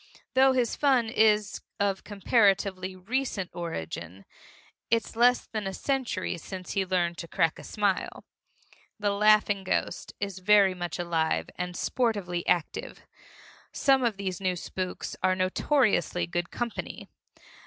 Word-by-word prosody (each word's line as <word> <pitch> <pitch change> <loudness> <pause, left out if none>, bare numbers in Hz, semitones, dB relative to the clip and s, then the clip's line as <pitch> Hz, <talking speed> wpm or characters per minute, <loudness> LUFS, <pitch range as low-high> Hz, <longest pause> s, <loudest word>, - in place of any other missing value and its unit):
Though 265 0 +5
his 245 -3 +1
fun 260 -6 +3
is 215 -3 +2 0.2
of 200 -1 0
comparatively 195 -2 +1
recent 200 -1 -2
origin 95 - -6 0.6
it's 230 0 0
less 245 +2 +4
than 215 -3 -4
a 190 - -4
century 250 -10 -2
since 185 +1 -7
he 195 - +1
learned 175 -2 0
to 170 - -6
crack 165 -2 +1
a - - -10
smile 205 -3 -1 0.7
the 205 -1 +1
laughing 210 -1 +4
ghost 185 - -2
is 200 -2 -4
very 195 0 +5
much 175 -2 -4
alive 165 -2 -1
and 180 0 -4
sportively 200 -8 -1
active. 170 -3 -1 0.7
Some 270 -2 +3
of 230 -4 0
these 190 -2 -4
new 185 -1 0
spooks 185 +1 -5
are 185 0 +3
notoriously 185 - +1
good 175 0 -3
company. 240 -1 -5
195 Hz, 135 wpm, -28 LUFS, 180-220 Hz, 0.7 s, Though